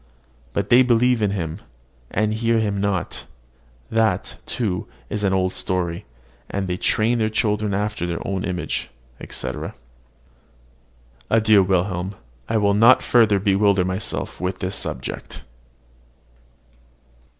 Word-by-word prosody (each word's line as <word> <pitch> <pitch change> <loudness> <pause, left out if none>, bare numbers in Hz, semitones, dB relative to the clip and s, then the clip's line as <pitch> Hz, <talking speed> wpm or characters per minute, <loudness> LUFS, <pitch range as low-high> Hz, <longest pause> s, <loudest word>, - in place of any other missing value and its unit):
But 100 0 -1
they 120 +2 +7
believe 125 -1 +3
in 105 - +2
him, 85 -5 -3 0.5
and 110 +1 0
hear 115 +1 +1
him 100 -3 0
not, 100 -4 -2 0.7
that, 110 -4 +1
too, 100 -7 -2 0.2
is 105 0 -2
an 100 - +2
old 95 -1 +1
story; 90 -2 -2 0.4
and 95 -1 -2
they 90 - -1
train 115 +5 +1
their 110 -1 +1
children 105 -1 0
after 105 -2 -1
their 85 -1 -4
own 95 -1 -2
image, 90 -1 -3 0.3
etc. 65 -1 -5 1.5
Adieu, 110 -2 +5
Wilhelm: 95 0 0 0.3
I 115 - +2
will 100 -1 +3
not 115 +5 +6
further 110 -4 +4
bewilder 100 -1 +3
myself 95 +3 -3
with 90 0 -2
this 95 +1 -3
subject. 65 - -5
100 Hz, 125 wpm, -22 LUFS, 95-110 Hz, 1.5 s, they